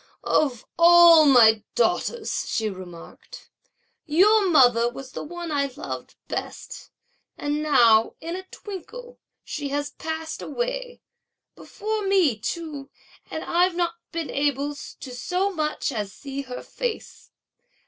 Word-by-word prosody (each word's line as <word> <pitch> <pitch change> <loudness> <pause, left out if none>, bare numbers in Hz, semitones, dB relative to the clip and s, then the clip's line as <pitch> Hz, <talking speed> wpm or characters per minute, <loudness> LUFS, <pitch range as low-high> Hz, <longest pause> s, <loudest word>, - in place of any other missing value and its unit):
"Of 260 -7 0
all 340 -2 +8
my 225 -5 +6
daughters," 475 -2 0
she 220 -2 -1
remarked, 185 - -12 0.6
"your 390 +6 +4
mother 245 -7 +5
was 260 +1 -10
the - - -6
one 345 +1 -7
I 280 -1 +1
loved - - -7
best, - - -6 0.5
and 295 +1 -2
now 235 -7 +4
in 335 +2 -5
a 375 0 -8
twinkle, 480 +5 -10 0.2
she 290 -2 -5
has 290 +1 -2
passed 320 0 -5
away, - - -4 0.5
before 435 +1 -4
me 370 - +3
too, 280 +5 -5 0.4
and 315 - -5
I've 355 +1 +2
not 340 -1 0 0.2
been 330 -2 -4
able 285 0 0
to 275 -2 -10
so 365 +10 -1
much 305 -5 -2
as 210 -5 -4
see 275 +3 -6
her 255 -2 -8
face. 485 -3 -6
310 Hz, 130 wpm, -24 LUFS, 265-360 Hz, 0.6 s, all